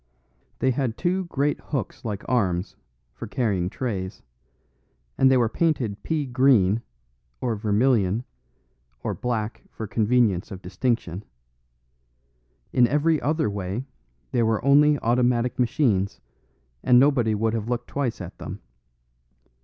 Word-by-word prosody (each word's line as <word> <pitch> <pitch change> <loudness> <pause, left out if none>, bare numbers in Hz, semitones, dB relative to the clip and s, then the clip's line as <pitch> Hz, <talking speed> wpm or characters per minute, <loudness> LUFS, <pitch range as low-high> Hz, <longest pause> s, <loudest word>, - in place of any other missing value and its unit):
They 130 - +2
had 125 -3 -2
two 185 +1 0
great 145 -3 0
hooks 135 -9 -4
like 105 -3 -5
arms, 95 -7 0 0.4
for 65 - -8
carrying 100 -7 0
trays; 100 -5 -4 0.9
and 130 - +5
they 130 - +5
were 120 -2 +3
painted 125 -7 0
pea 155 -3 -1
green, 120 -5 +3 0.6
or 120 -3 -1
vermilion, 110 0 +2 0.8
or - - -1
black 115 -3 -3
for 110 - -6
convenience 110 -3 +1
of 95 -1 -9
distinction; 95 -1 -2 1.5
in 125 -1 +5
every 150 +3 +2
other 155 +3 +1
way 100 +4 -3 0.5
they 120 - +1
were 110 +1 +1
only 145 +1 +5
automatic 120 +1 +1
machines 115 -6 +1 0.6
and 125 0 +5
nobody 125 -6 +3
would 110 +1 0
have 115 0 -3
looked 120 -1 -2
twice 135 -5 -2
at - - -9
them. - - -7
120 Hz, 125 wpm, -24 LUFS, 105-130 Hz, 1.5 s, and